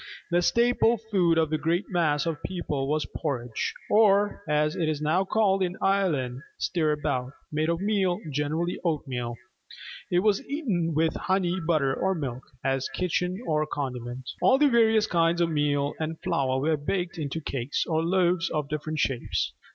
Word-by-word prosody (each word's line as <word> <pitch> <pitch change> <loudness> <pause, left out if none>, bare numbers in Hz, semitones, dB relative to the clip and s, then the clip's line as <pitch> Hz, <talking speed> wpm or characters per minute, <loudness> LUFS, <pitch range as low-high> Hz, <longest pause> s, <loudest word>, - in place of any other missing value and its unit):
The 175 +1 +3
staple 235 +3 +3
food 190 -7 +1
of 160 -1 +2
the 155 - 0
great 170 +5 0
mass 155 -5 +1
of 165 -2 -1
the - - -3
people 150 -7 -3
was 150 +2 0
porridge, 125 -7 -3 0.2
or, 205 -1 +4
as 150 +1 +2
it 165 -4 0
is 155 -2 -1
now 155 +5 +2
called 195 -1 +2
in 180 0 -1
Ireland, 150 -11 +1 0.2
stirabout, 150 -6 -1 0.2
made 155 +1 0
of 170 +1 0
meal, 195 -3 +1
generally 155 +5 -1
oatmeal. 130 -8 -2 0.8
It 175 0 +3
was 210 +3 +2
eaten 195 - -1
with 160 +1 +2
honey, 190 -1 0
butter, 155 -6 +1
or 190 +6 0
milk, 130 -6 -4 0.2
as 135 0 0
kitchen 180 0 -1
or 155 -1 +1
condiment. 125 -3 -5
All 260 - +5
the 290 +1 +4
various 225 -3 +4
kinds 170 -2 +2
of 170 -1 +2
meal 145 -1 +1
and 160 0 -3
flour 130 -1 0
were 155 +3 +1
baked 175 +4 -2
into 150 +1 -3
cakes 135 -3 -2
or 160 0 0
loaves 180 0 +2
of 150 -2 -2
different 155 +1 -3
shapes. 135 -4 -1
160 Hz, 165 wpm, -27 LUFS, 145-185 Hz, 0.8 s, All